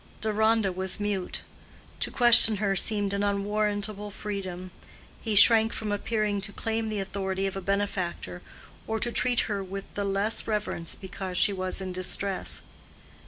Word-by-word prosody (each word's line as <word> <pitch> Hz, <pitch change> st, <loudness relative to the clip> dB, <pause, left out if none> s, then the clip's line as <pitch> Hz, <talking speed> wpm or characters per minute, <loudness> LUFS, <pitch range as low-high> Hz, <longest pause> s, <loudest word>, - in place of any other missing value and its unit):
Deronda 220 Hz, -1 st, +2 dB
was 185 Hz, +2 st, -3 dB
mute: 205 Hz, -3 st, -2 dB, 0.6 s
to -, -, +2 dB
question 240 Hz, -3 st, +7 dB
her 200 Hz, -1 st, 0 dB
seemed 205 Hz, 0 st, +1 dB
an 200 Hz, -, -1 dB
unwarrantable 205 Hz, 0 st, -1 dB
freedom; 190 Hz, -3 st, -6 dB, 0.5 s
he 220 Hz, -2 st, -1 dB
shrank 225 Hz, +2 st, +7 dB
from 215 Hz, -1 st, -3 dB
appearing 210 Hz, -1 st, -1 dB
to 195 Hz, +1 st, -1 dB
claim 225 Hz, +1 st, -2 dB
the 215 Hz, -1 st, -2 dB
authority 195 Hz, 0 st, -2 dB
of 195 Hz, -, -2 dB
a 195 Hz, -, -4 dB
benefactor, 185 Hz, -, -2 dB, 0.5 s
or 220 Hz, 0 st, -1 dB
to 240 Hz, +2 st, 0 dB
treat 245 Hz, 0 st, +2 dB
her 205 Hz, -3 st, -3 dB
with 195 Hz, +1 st, -6 dB
the 205 Hz, -, -2 dB
less 200 Hz, +2 st, 0 dB
reverence 210 Hz, -6 st, -3 dB
because 190 Hz, -1 st, -6 dB
she 205 Hz, -, +4 dB
was 185 Hz, 0 st, -1 dB
in 190 Hz, -1 st, -4 dB
distress. 185 Hz, +1 st, -1 dB
200 Hz, 155 wpm, -27 LUFS, 190-215 Hz, 0.6 s, question